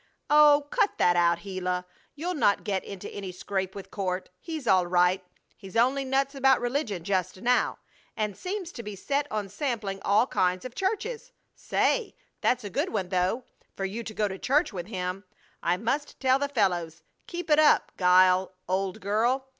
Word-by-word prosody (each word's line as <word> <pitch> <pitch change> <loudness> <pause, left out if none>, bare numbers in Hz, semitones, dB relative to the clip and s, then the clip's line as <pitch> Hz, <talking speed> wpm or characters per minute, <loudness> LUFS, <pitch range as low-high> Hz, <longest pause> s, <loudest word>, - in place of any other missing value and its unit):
"Oh, 295 -1 +7
cut 455 -5 +1
that 175 - +4
out, 170 0 +3
Gila! 180 -2 -3 0.3
You'll 340 +5 -3
not 205 - +2
get 195 -2 -1
into 195 -2 -8
any 195 -2 -6
scrape 190 +1 -3
with 195 - -9
Court. 185 -2 -3
He's 315 - -6
all 185 -5 +4
right. 180 +1 +3 0.3
He's 195 +1 -7
only 260 +4 +3
nuts 270 +1 0
about 270 -1 +4
religion 245 - -2
just 185 0 -1
now, 250 +1 +2 0.4
and 210 -3 -1
seems 370 -2 -5
to 240 - -7
be 210 -2 -7
set 285 +8 -1
on 210 -2 -2
sampling 205 -3 -3
all 210 +4 +4
kinds 185 -5 0
of 255 - -6
churches. 435 - -3 0.2
Say! 475 -5 0 0.3
that's 250 -1 +1
a 205 - -5
good - - 0
one, 190 -4 -2
though, 185 +7 0 0.3
for 195 - -3
you 215 +5 -4
to 220 - -6
go 210 - +1
to 190 -1 -6
church 290 -1 +1
with 175 -2 -5
him! 185 -1 -4 0.4
I 175 +1 +1
must 265 +8 -2
tell 260 0 +3
the 285 0 -1
fellows. 175 - 0 0.2
Keep 345 -2 -5
it 300 - +6
up, 310 - +4
Guile, 185 +1 +4
old 190 +3 -1
girl! 230 +7 +1
205 Hz, 180 wpm, -27 LUFS, 185-275 Hz, 0.4 s, Oh